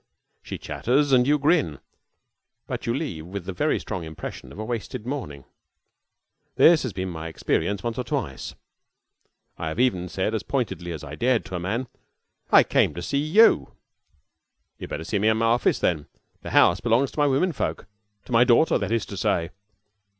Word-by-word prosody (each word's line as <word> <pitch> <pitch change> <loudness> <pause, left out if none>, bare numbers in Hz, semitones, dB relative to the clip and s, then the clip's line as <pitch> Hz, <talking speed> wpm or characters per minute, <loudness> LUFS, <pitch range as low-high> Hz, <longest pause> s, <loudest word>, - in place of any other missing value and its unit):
She - - -6
chatters, 140 +4 0
and 125 -1 +5
you 150 +1 +4
grin, 145 - +2 0.9
but - - -5
you 115 - +1
leave 90 - -4
with 95 -1 -6
the 95 - -4
very 90 - +1
strong 90 - -5
impression 80 -1 -8
of - - -12
a 110 - -4
wasted 115 0 -5
morning. 120 - -5 1.1
This 165 -1 +6
has 130 - -3
been 95 -1 -4
my 80 -2 -6
experience 85 +4 -1
once 120 0 -3
or - - -1
twice. - - -4 1.0
I 80 - -3
have 80 - -4
even 95 -8 +1
said 95 +5 -2
as 110 - -1
pointedly 105 -10 -3
as 80 -3 -6
I 75 0 -8
dared 120 +7 +1
to 95 - -6
a - - -2
man: 110 +9 -2 0.7
"I - - +8
came - - +1
to 85 - -5
see 140 - 0
you." 185 +10 +4 1.1
"You'd - - -7
better 80 - -4
see 100 +5 -1
me 105 - +2
in 110 0 +3
my 115 - +1
office, 115 +2 +2
then. 80 -5 -1 0.3
The - - -7
house 85 - +5
belongs 120 +3 +2
to - - -7
my 145 - +4
women 145 +7 +2
folk 80 - -3 0.4
to - - -12
my 115 0 +6
daughter, 125 +6 +4
that - - -3
is 115 -2 0
to 100 - -8
say." 90 -5 0
110 Hz, 190 wpm, -24 LUFS, 90-130 Hz, 1.1 s, I